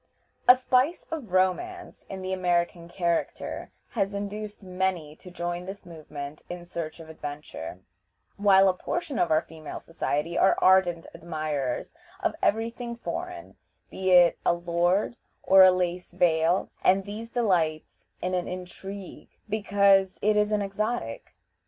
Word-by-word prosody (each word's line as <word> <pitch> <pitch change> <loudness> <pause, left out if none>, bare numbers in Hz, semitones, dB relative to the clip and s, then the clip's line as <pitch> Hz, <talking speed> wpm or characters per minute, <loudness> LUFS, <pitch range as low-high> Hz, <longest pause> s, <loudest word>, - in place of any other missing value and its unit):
A 250 - +10
spice 255 +5 +1
of 285 - -5
romance 270 - -1
in 190 -1 -6
the 185 0 -2
American 175 -2 0
character 170 -1 -2 0.2
has 200 -3 -1
induced 205 +1 -5
many 180 -5 -2
to 185 - -12
join 175 0 -4
this 195 +1 -8
movement 150 -3 -8
in 175 0 -7
search 170 -2 -6
of 165 - -10
adventure, 145 - -7 0.5
while 195 -1 +5
a 185 - +4
portion 290 - -3
of - - +2
our 155 +1 +3
female 160 -2 -8
society 165 0 -2
are 190 - +4
ardent 180 -3 +4
admirers 155 -6 -3 0.3
of - - 0
every 225 +2 +2
thing 235 0 -6
foreign, 350 +8 -6 0.3
be 190 0 -2
it 175 -2 +6
a - - +4
lord 175 +6 +1 0.3
or 190 0 +7
a 185 - +10
lace 180 0 -1
veil, 170 0 +2
and 190 +1 +4
these 215 +3 -7
delight 175 -10 0 0.2
in 185 +1 -1
an 180 -1 -1
intrigue 185 +1 -8 0.2
because 200 -2 +3
it 210 +1 +4
is 210 0 +2
an 210 -1 +1
exotic. 200 - -3
185 Hz, 145 wpm, -27 LUFS, 170-205 Hz, 0.5 s, A